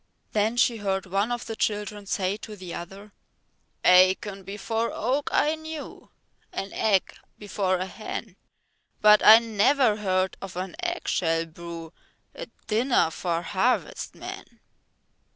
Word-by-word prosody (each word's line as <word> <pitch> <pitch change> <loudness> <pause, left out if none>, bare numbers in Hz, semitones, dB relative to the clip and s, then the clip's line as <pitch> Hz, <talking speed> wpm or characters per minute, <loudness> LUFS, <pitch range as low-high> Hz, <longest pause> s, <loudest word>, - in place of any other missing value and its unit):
Then 215 +3 +1
she 240 -1 +3
heard 195 -2 -2
one 195 +5 0
of 240 -1 -3
the 225 - -5
children 210 -1 -2
say 190 0 0
to 215 0 -9
the 185 -3 -8
other: 195 +4 -9 0.7
Acorn 190 +2 +4
before 215 +4 -3
oak 265 +6 -1
I 300 - +3
knew, 315 -1 -8 0.4
An 195 - -5
egg 200 -4 +1 0.2
before 195 -2 -1
a 185 - -3
hen, 215 +1 -7 0.6
But 210 0 +6
I 220 +1 +10
never 230 +1 +2
heard 185 -2 0
of 195 -2 -8
an 185 +7 -4
eggshell 170 - 0
brew 165 0 -9 0.4
A - - -8 0.2
dinner 230 -6 +2
for 170 0 -2
harvest 205 +8 -1
men. - - -10
205 Hz, 135 wpm, -26 LUFS, 185-225 Hz, 0.7 s, I